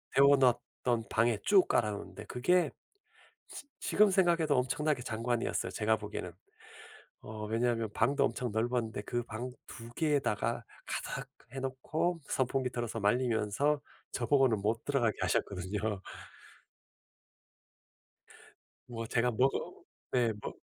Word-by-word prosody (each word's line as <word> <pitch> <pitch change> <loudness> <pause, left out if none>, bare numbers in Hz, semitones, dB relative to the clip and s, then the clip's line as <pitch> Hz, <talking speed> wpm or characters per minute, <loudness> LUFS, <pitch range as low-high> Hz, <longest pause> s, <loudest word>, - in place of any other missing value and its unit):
데워 140 +1 +7
놨던 120 -2 +1
방에 115 0 +2
쭉 200 -2 +5
깔아 105 -2 +2
놓는데 100 - -7
그게 165 +5 +2 0.8
지 285 - -9
지금 210 0 +4
생각해도 175 -4 +3
엄청나게 140 +2 +1
장관이었어요 115 0 -1
제가 110 0 +1
보기에는. 105 -4 -5 0.9
어 105 0 -6
왜냐하면 115 0 0
방도 140 +1 +3
엄청 125 -1 -2
넓었는데 115 -1 -1
그 120 +2 -2
방 120 +3 -5 0.2
2 115 -1 -10
개에다가 145 -8 0 0.2
가득 - - -4 0.2
해놓고 135 +6 -2
선풍기 130 0 0
틀어서 120 -2 -3
말리면서 120 +5 +1 0.3
저 120 - -1
보고는 135 -7 +4
못 110 +3 -1
들어가게 120 -7 +1
하셨거든요. 100 +2 -1 2.9
뭐 115 -2 -5
제가 120 +2 +2
먹어 130 +4 0 0.3
예 120 -2 +3
먹 - - -6
120 Hz, 265 characters per minute, -32 LUFS, 110-135 Hz, 2.9 s, 데워